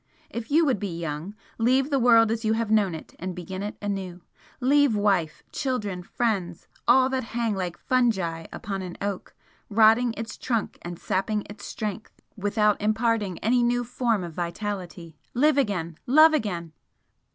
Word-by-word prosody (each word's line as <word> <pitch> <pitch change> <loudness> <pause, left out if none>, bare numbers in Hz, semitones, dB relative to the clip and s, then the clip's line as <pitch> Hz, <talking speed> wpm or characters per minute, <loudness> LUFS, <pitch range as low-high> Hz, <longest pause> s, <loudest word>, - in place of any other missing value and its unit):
If 235 0 -5
you 320 +3 +4
would 260 -8 +1
be 180 -5 -4
young, 165 +5 -5 0.2
leave 260 +5 +2
the 275 - +3
world 230 -2 +5
as 225 0 -2
you 220 0 +2
have 225 -1 -1
known 205 -6 +3
it 160 - -10
and 185 0 -4
begin 185 +2 -6
it 205 +1 -5
anew, 190 -3 -4 0.4
leave 280 -2 +4
wife, 195 -7 +1
children, 210 -9 -2
friends, 190 -4 -2 0.2
all 255 +2 +6
that 265 -1 -1
hang 230 -2 +1
like 180 -3 -3
fungi 190 -10 0
upon 195 -2 -4
an 180 -2 -7
oak, 200 -2 -4 0.3
rotting 225 +2 +4
its 225 -2 -6
trunk 230 -4 -2
and 175 0 -6
sapping 205 +4 -1
its 205 0 -10
strength 215 -1 -5 0.2
without 210 +1 +1
imparting 215 -3 +1
any 245 +3 +3
new 245 0 +2
form 235 -4 0
of 170 -2 -7
vitality. 175 -2 -5 0.2
Live 290 +3 +4
again 175 - -1
love 310 +5 +7
again!" 175 - -2
210 Hz, 165 wpm, -26 LUFS, 185-240 Hz, 0.4 s, love